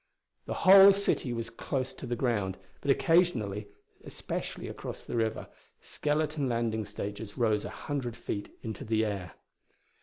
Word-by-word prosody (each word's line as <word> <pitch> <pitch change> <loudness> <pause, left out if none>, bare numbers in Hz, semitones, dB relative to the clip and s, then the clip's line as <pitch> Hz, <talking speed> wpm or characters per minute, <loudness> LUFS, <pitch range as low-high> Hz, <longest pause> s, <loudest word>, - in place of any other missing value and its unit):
The - - -2
whole 195 +1 +10
city 195 -9 0
was 115 -1 -3
close 130 +2 -3
to - - -8
the 120 - -1
ground, 105 -6 0 0.2
but 140 - -4
occasionally, 125 - +2 0.4
especially - - -5
across - - -7
the - - -4
river, 110 -1 -1 0.3
skeleton 150 -2 -1
landing 115 -2 0
stages 100 +2 -6
rose 110 -4 +2
a - - -4
hundred 130 -6 -4
feet 100 -2 -4
into 110 +4 -5
the 110 -2 +1
air. 100 -5 -4
115 Hz, 145 wpm, -30 LUFS, 110-140 Hz, 0.4 s, whole